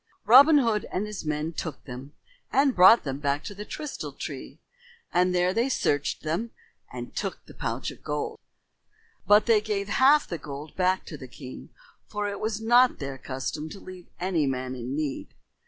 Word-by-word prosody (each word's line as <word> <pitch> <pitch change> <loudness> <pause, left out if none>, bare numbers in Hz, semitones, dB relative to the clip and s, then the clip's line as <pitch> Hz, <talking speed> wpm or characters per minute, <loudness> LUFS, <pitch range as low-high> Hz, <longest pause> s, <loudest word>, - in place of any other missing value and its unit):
And 210 - -19
Robin 285 +6 +9
Hood 230 -6 +1
and 195 - -1
his 210 -4 -6
men 150 +2 -2
took 155 -3 -6
them 130 +3 -9 0.4
and 275 -1 +3
brought 185 +6 +8
them 135 0 -4
to 145 +6 -1
the 205 +1 -8
Trystal 300 +4 -6
Tree, - - -7 0.5
and 180 +1 +3
there 180 +1 +2
they 235 +5 +1
searched 145 - 0
them 165 +9 -2 0.4
and - - -8
took - - -4
the - - -14
pouch - - -3
of - - -15
gold. - - -3 0.9
But 210 +1 +6
they 225 -3 +4
gave 205 -2 -3
half 275 +7 +5
the 170 - -5
gold 145 +1 -8
back 185 0 +1
to 150 - -8
the 130 - -10
king, 130 0 -10 0.4
for 205 -1 -3
it 200 -1 -4
was 215 0 -2
not 240 +3 +4
their 135 -2 -6
custom 135 +4 -4
to 195 - -9
leave 185 -2 -11
any 175 -5 0
man 130 -1 -2
in 125 +1 -5
need. 150 -3 -4
180 Hz, 185 wpm, -26 LUFS, 145-215 Hz, 0.9 s, Robin